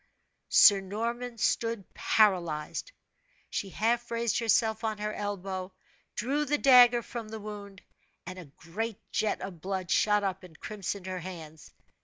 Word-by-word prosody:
Sir 210 - +7
Norman 230 +5 -4
stood 230 -2 -1
paralyzed. 180 - +1 0.6
She 200 - -3
half 235 +5 0
raised 235 0 0
herself 225 -1 +2
on 220 -1 -1
her 210 0 -3
elbow, 195 -2 -4 0.4
drew 275 +6 0
the 295 0 0
dagger 245 -4 +7
from 230 -2 -7
the 220 0 -6
wound, 205 -2 -9 0.4
and 185 0 -7
a 180 - -9
great 185 +10 -5
jet 215 - 0
of 175 -5 -7
blood 190 -2 -3
shot 210 -1 +3
up 190 -1 -2
and 180 -4 -15
crimsoned 200 -2 -5
her 185 -1 -4
hands. 160 -4 -9
210 Hz, 145 wpm, -29 LUFS, 185-230 Hz, 0.6 s, Sir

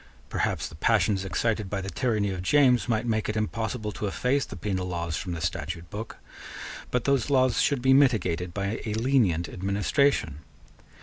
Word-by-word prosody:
Perhaps - - -1
the - - -13
passions 100 +3 +2
excited 105 +2 -1
by 100 - -2
the 95 0 -5
tyranny 110 -6 0
of 90 -1 -4
James 125 +2 +3
might 115 0 +1
make 110 -3 0
it 110 - -1
impossible 110 0 -2
to 105 +2 -4
efface 130 +7 0
the - - -9
penal 95 -1 -2
laws 85 -2 -3
from 90 +1 -4
the 80 - -5
statute 85 0 -4
book 110 +2 -6 0.7
but 125 -2 0
those 140 -1 +1
laws 130 -3 +3
should 140 -4 +1
be 130 0 +5
mitigated 95 -11 +2
by 100 +4 -3
a 105 -1 -3
lenient 110 -9 +2
administration. 100 - 0
105 Hz, 175 wpm, -27 LUFS, 90-125 Hz, 0.7 s, be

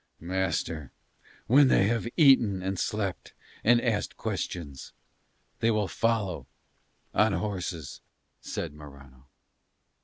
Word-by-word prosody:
"Master, 85 -5 -2 0.5
when 140 +3 +6
they 100 - +4
have 115 +2 0
eaten 120 - +5
and 95 0 -2
slept 100 -4 -3 0.3
and 120 +2 +5
asked 110 -4 -1
questions 70 -6 -5 0.7
they 115 - +2
will 105 -3 +1
follow 110 -5 -1 0.7
on 105 -1 +3
horses," 90 -8 -4 0.4
said - - -5
Morano. 70 -3 -14
95 Hz, 100 wpm, -28 LUFS, 80-115 Hz, 0.7 s, when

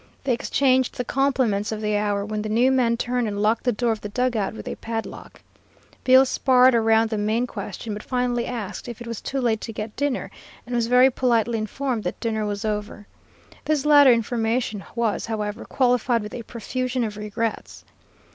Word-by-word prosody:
They 265 -2 +1
exchanged 260 +1 +1
the 250 - -2
compliments 250 -7 +1
of 215 - -3
the 210 -1 -1
hour, 205 -1 0
when 215 0 -3
the 215 - -4
new 240 +5 +3
man 240 -3 +2
turned 245 0 -1
and 205 -1 -3
locked 215 +2 +1
the 245 - +3
door 235 +1 0
of 220 - -3
the 210 - -6
dug 250 +3 0
out 205 -1 -1
with - - -9
a - - -3
padlock. 225 -1 -6 0.6
Bill 260 +1 +6
sparred 255 -1 +4
around 225 -1 +3
the 215 - -1
main 220 +4 +1
question, 230 -2 -6
but 210 - -6
finally 245 -2 -1
asked 230 -4 -5
if 240 -1 -7
it 240 - -8
was 230 -2 -6
too 275 - -3
late 230 -4 0
to 225 - -5
get 215 0 -6
dinner, 285 -2 -2 0.3
and 245 - -7
was 235 -1 +1
very 250 +2 +5
politely 235 -2 +1
informed 235 +1 -3
that 180 - -3
dinner 220 -2 -1
was 205 +1 -3
over. 210 -1 -4 0.6
This 300 -2 0
latter 290 -3 +7
information 230 -2 0
was, 230 -3 -1
however, 215 0 -4
qualified 245 -3 +1
with 210 - -8
a 240 - -5
profusion 250 +3 -3
of 215 -2 -3
regrets. 210 +2 -4
230 Hz, 195 wpm, -23 LUFS, 215-250 Hz, 0.6 s, latter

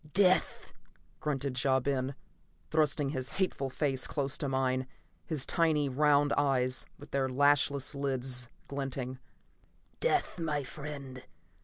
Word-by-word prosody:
"Death!" 185 -2 +3 0.5
grunted 135 -3 -1
Ja 130 -1 +4
Ben, 135 0 -1 0.6
thrusting 150 -2 +2
his 130 -2 -3
hateful 180 -8 -1
face 135 -1 0
close 140 -2 -1
to 140 - -1
mine, 130 -1 0 0.4
his 155 -6 -1
tiny 155 -4 +2
round 145 +1 +3
eyes, 130 -3 +1
with 145 - -13
their 135 -1 +1
lashless 140 +1 +3
lids 130 -3 -1 0.2
glinting. 135 -2 -4 0.8
"Death, - - +1
my 150 -3 -1
friend. 140 -2 -7
140 Hz, 120 wpm, -31 LUFS, 130-145 Hz, 0.8 s, Ja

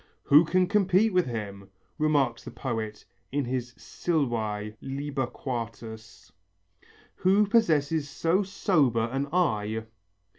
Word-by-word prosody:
"Who 150 +4 +6
can 185 +3 +2
compete 200 +1 +3
with 180 -4 +3
him," 100 -4 -6 0.3
remarks 140 -6 +1
the - - -7
poet 110 -4 -4 0.3
in 140 0 0
his 125 -1 -3
Silvæ, 110 -10 -2
lib. 140 +1 -4
IV, 115 -3 -5 0.9
"who 195 +3 +4
possesses 160 -9 +2
so 165 +6 +1
sober 145 - +1
an 135 +2 -1
eye? 110 -11 0
135 Hz, 110 wpm, -27 LUFS, 115-170 Hz, 0.9 s, Who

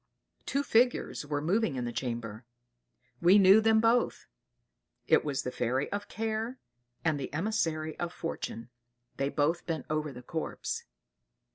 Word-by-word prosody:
Two 280 +1 0
figures 240 - +2
were 145 -1 -2
moving 185 -1 +1
in 125 -1 -2
the 120 - -3
chamber. 115 -3 -4 0.8
We 180 +4 +7
knew 195 +2 +7
them 220 0 +4
both; 230 +2 +2 0.8
it - - +5
was 140 -3 -2
the 125 - -3
fairy 130 +4 -1
of 205 0 -3
Care, 225 +3 -3 0.5
and 155 -3 +2
the 135 - -5
emissary 160 -3 -1
of 175 -1 -2
Fortune. 125 -9 -5 0.5
They 140 0 0
both 150 +4 0
bent 165 -2 -2
over 155 -1 -1
the 125 -1 -10
corpse. 445 - -4
160 Hz, 145 wpm, -30 LUFS, 140-220 Hz, 0.8 s, We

